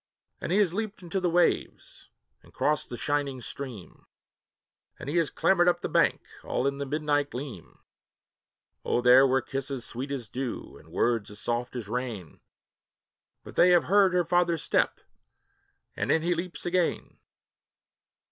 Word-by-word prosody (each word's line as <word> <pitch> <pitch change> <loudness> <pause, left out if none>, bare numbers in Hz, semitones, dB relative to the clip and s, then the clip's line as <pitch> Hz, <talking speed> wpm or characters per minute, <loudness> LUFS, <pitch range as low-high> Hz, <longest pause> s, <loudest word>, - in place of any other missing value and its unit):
And - - -4
he 190 - +3
has 200 -5 +3
leaped 210 -1 -4
into 175 +3 -2
the 180 -1 0
waves, 175 +1 0 0.3
and - - -20
crossed 150 -1 0
the 120 - -6
shining 145 -2 -1
stream, 120 -6 -8 0.9
And - - -9
he 150 +5 -1
has 165 -3 +2
clambered 180 -2 +3
up 175 - 0
the - - -3
bank, - - +2 0.2
all 125 - -1
in 140 0 -1
the 140 - -3
moonlight 145 0 0
gleam; 125 - -8 1.1
Oh 120 - +1
there 125 +2 +7
were 130 -1 +1
kisses 135 -1 -4
sweet 130 +4 -5
as 130 -5 -4
dew, 125 +2 -5
and 80 - -16
words 115 +3 0
as 105 - -10
soft 120 +2 -2
as 120 -5 -5
rain, 115 -7 -5 1.0
But - - -12
they 180 - +6
have 175 -1 +5
heard 195 0 +4
her 175 -1 +2
father's 170 -1 +1
step, - - +1 0.9
and - - -1
in 160 - +2
he 175 +1 +2
leaps 175 +1 -5
again! 175 -1 -1
140 Hz, 160 wpm, -27 LUFS, 125-175 Hz, 1.1 s, there